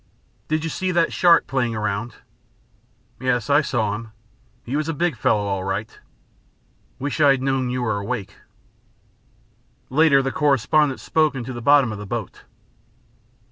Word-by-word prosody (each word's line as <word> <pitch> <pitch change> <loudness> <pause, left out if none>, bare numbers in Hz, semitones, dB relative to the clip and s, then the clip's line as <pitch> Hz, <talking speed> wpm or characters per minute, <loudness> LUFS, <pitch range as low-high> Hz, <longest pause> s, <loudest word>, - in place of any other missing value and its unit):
"Did 155 0 -1
you 165 - -2
see 185 +3 -2
that 170 -1 +1
shark 170 -2 +4
playing 120 -4 -1
around?" 110 +2 -3 1.0
"Yes, 125 0 -1
I 145 +2 +5
saw 110 -8 -1
him. 110 +1 -8 0.5
He 125 - -3
was 155 +1 -1
a 165 - -2
big 170 0 0
fellow, 105 -2 +1
all 100 -2 -2
right." 95 +3 -4 1.0
"Wish 145 +3 -3
I 145 - +6
had 135 -1 +2
known 135 -2 0
you 125 0 -2
were 110 -3 -1
awake." 100 -2 -5 1.5
Later 140 -1 +4
the 135 - -1
correspondent 145 0 +2
spoke 155 -2 +1
into 130 0 -5
the 120 - -7
bottom 140 -1 +4
of 105 - -6
the 105 - -8
boat. - - -5
130 Hz, 155 wpm, -22 LUFS, 110-150 Hz, 1.5 s, I